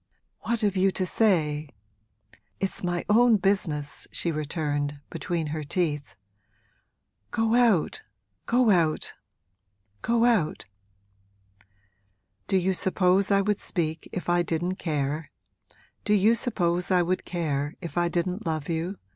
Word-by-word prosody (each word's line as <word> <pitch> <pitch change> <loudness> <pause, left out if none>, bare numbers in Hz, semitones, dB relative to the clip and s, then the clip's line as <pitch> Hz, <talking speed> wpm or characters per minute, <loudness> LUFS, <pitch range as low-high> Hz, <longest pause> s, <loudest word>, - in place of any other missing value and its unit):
'What 235 +1 -2
have 205 -2 +1
you 190 +1 +3
to 185 - -1
say? 155 -8 +1 0.9
It's 195 -1 -3
my 175 -1 -1
own 230 +1 +5
business!' 175 -7 -1
she 170 - -1
returned, 145 -2 -2
between 170 -3 -2
her 155 -1 -3
teeth. 145 - -2 1.1
'Go 225 0 +1
out, 240 - +3 0.5
go 240 -2 +4
out, 165 -5 +1 0.9
go 235 0 +2
out!' 215 -11 +1 1.8
'Do 195 - +2
you 190 +1 +1
suppose 185 +1 +2
I 200 -1 +4
would 205 0 0
speak 160 -3 -2
if 180 - -5
I 175 0 +3
didn't 175 +2 -2
care 150 -1 -2 0.7
do 210 - +3
you 210 +3 +5
suppose 180 -7 0
I 180 -2 +4
would 185 +2 -1
care 150 -4 -2
if 165 -4 -7
I 175 0 +2
didn't 180 +4 -2
love 155 -3 -3
you?' 170 +4 -2
175 Hz, 130 wpm, -26 LUFS, 155-200 Hz, 1.8 s, own